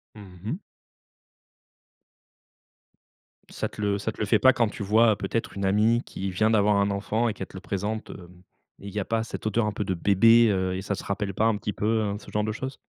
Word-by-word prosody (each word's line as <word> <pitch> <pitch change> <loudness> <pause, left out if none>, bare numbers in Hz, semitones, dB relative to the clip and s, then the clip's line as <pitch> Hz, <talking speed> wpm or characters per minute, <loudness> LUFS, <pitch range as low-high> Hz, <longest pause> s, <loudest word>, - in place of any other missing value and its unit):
Mmh 95 -4 -13
mh. 150 - -3 2.9
Ça - - -3
te 105 - -9
le 100 -1 +1
ça 105 +2 -3
te - - -16
le 105 - 0
fait 105 +2 +3
pas 130 0 +6
quand 120 -3 +2
tu 105 - -6
vois 110 +2 +4
peut-être 110 +4 -3
une 100 - -1
amie 110 +5 +3
qui 95 +1 -5
vient 110 +4 +2
d'avoir 105 -1 +3
un 100 0 +2
enfant 110 +4 -1
et - - -2
qu'elle 95 - -7
te - - -11
le - - -8
présente, 105 +3 -4
heu, 90 -3 -11 0.5
et 100 - -9
il - - -12
y 105 - -1
a 95 - -2
pas 115 0 0
cette 115 - -7
odeur 110 +1 +1
un 105 - 0
peu 105 - -3
de 95 -2 -2
bébé, 115 +5 +5
heu, 95 -2 0
et 95 - -4
ça 100 0 -2
te - - -8
rappelle 100 0 -3
pas 110 +4 +1
un 115 - +3
petit 105 0 -4
peu, 105 - -4 0.3
heu, - - -4
ce - - -14
genre 105 - 0
de 110 - -1
choses? 130 +4 -5
105 Hz, 240 wpm, -26 LUFS, 100-110 Hz, 2.9 s, pas